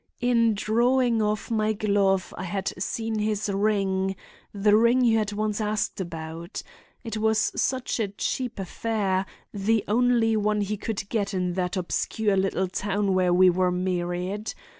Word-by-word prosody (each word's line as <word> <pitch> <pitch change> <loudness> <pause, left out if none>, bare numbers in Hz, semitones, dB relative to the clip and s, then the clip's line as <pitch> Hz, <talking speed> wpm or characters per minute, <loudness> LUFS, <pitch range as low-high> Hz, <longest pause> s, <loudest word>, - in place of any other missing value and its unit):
In 235 -3 +3
drawing 235 +2 +2
off 210 +1 -1
my 215 -1 +1
glove 200 -3 +1
I 185 - -5
had 190 +2 -2
seen 225 +2 -2
his 210 -1 -1
ring—the 195 0 0
ring 235 +3 +4
you 225 -1 +4
had 210 -1 -1
once 210 +1 -2
asked 210 -2 -1
about. 165 +1 -6 0.4
It 225 -3 -4
was 220 0 +2
such 260 -2 -1
a 220 - +1
cheap 245 +5 -3
affair; 195 -1 -1 0.3
the 210 +1 +1
only 230 0 +3
one 210 0 +1
he 205 +1 -1
could 205 -1 -4
get 205 -3 -1
in 180 -1 -1
that 180 +1 -2
obscure 205 +3 0
little 190 0 0
town 200 +1 -1
where 185 -1 +2
we 180 +1 +6
were 180 +1 +1
married. 180 +3 -2
205 Hz, 150 wpm, -25 LUFS, 190-220 Hz, 0.4 s, we